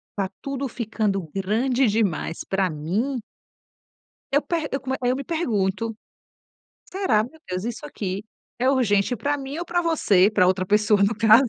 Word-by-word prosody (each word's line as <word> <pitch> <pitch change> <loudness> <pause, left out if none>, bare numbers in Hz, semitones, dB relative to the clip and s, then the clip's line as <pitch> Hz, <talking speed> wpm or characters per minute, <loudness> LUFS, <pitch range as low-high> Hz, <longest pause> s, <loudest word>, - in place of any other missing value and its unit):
tá 195 -2 -1
tudo 275 0 -3
ficando 210 -7 -2
grande 235 +7 +1
demais 200 -7 0
pra 190 -1 0
mim. 190 - -1 1.1
Eu 285 - +4
per 325 -2 -1
eu 275 - -1
come 265 0 -2
eu 250 +1 +2
me 275 - -4
pergunto. 225 - -1 0.9
Será, 370 - +1
meu 310 +8 -10
Deus, 185 +1 -3
isso 240 +5 -4
aqui 200 -7 -4 0.3
é 255 +2 +2
urgente 245 -3 +2
pra 285 +6 0
mim 275 +2 -5
ou 345 - -3
pra 350 0 0
você, 210 - +4
pra 205 -4 +4
outra 185 0 +1
pessoa 210 0 +3
no 200 +3 +3
caso, 225 +4 +6
225 Hz, 160 wpm, -24 LUFS, 195-270 Hz, 1.1 s, caso